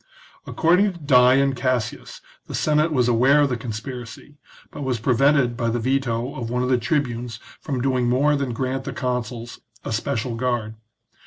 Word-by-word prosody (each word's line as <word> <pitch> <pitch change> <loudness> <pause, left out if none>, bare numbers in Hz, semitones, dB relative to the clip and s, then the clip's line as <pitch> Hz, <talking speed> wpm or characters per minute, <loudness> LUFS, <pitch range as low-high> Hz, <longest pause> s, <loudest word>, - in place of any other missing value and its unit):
According 180 +4 +2
to - - -11
Dion 135 -1 +4
Cassius 130 -3 -3 0.3
the - - -5
Senate 155 +1 +2
was 125 -5 +2
aware 130 +5 +4
of 145 - +3
the 125 - -1
con 120 +1 -7
spiracy, 120 +4 -8 0.3
but - - -8
was 130 -4 -1
prevented 130 +2 +2
by 115 -1 -1
the 115 - -1
veto 125 0 -1
of 120 -3 -5
one 125 +1 -1
of 125 - -1
the 125 -1 +3
tribunes 120 -3 -2 0.2
from 135 -5 -3
doing 125 -2 +1
more 145 +4 +3
than 140 -3 -2
grant 130 +2 -3
the - - -4
consuls 125 -2 -4 0.3
a - - -4
special 115 +1 -2
guard. 115 -2 -2
125 Hz, 175 wpm, -22 LUFS, 120-140 Hz, 0.3 s, Dion